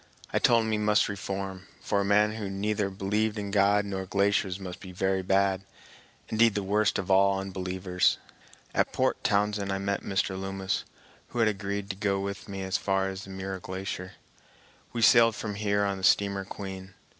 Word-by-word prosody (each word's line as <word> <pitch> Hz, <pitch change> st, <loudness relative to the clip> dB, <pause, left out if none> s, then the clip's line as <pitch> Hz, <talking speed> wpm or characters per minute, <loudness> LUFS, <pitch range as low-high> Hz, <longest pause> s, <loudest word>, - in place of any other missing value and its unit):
I -, -, +3 dB
told 115 Hz, -2 st, +4 dB
him 110 Hz, -, -1 dB
he 105 Hz, -, +1 dB
must 105 Hz, 0 st, +3 dB
reform, 95 Hz, -1 st, -5 dB
for 100 Hz, -, 0 dB
a -, -, +1 dB
man 105 Hz, +2 st, +3 dB
who 105 Hz, -2 st, -4 dB
neither 100 Hz, +1 st, -1 dB
believed 105 Hz, +3 st, -1 dB
in 100 Hz, -1 st, -4 dB
God 100 Hz, 0 st, +3 dB
nor 95 Hz, -1 st, -4 dB
glaciers 100 Hz, -1 st, +1 dB
must 90 Hz, -2 st, -7 dB
be 95 Hz, -2 st, -10 dB
very 95 Hz, +1 st, 0 dB
bad, 95 Hz, 0 st, +2 dB, 0.7 s
indeed 115 Hz, 0 st, +3 dB
the 100 Hz, -, -1 dB
worst 105 Hz, +3 st, +2 dB
of 95 Hz, 0 st, -2 dB
all 100 Hz, 0 st, +4 dB
unbelievers. 95 Hz, -1 st, 0 dB, 0.6 s
At -, -, +1 dB
Port -, -, 0 dB
Townsend 100 Hz, -1 st, +1 dB
I 95 Hz, -, 0 dB
met 100 Hz, 0 st, -1 dB
Mr. 95 Hz, 0 st, 0 dB
Loomis, 95 Hz, 0 st, -3 dB, 0.4 s
who -, -, -9 dB
had 115 Hz, -2 st, +4 dB
agreed 100 Hz, -1 st, -2 dB
to -, -, -7 dB
go 100 Hz, -1 st, 0 dB
with 100 Hz, +1 st, -5 dB
me 95 Hz, -1 st, -4 dB
as 95 Hz, +1 st, 0 dB
far 95 Hz, -1 st, 0 dB
as 95 Hz, 0 st, -6 dB
the -, -, -12 dB
Muir 95 Hz, 0 st, -5 dB
Glacier. 95 Hz, 0 st, -5 dB, 0.8 s
We 115 Hz, -1 st, -1 dB
sailed 115 Hz, -1 st, +6 dB
from 105 Hz, -1 st, -4 dB
here 100 Hz, 0 st, +1 dB
on 100 Hz, -1 st, -2 dB
the -, -, -10 dB
steamer 100 Hz, 0 st, +3 dB
Queen. 95 Hz, -1 st, -8 dB
100 Hz, 190 wpm, -28 LUFS, 95-105 Hz, 0.8 s, sailed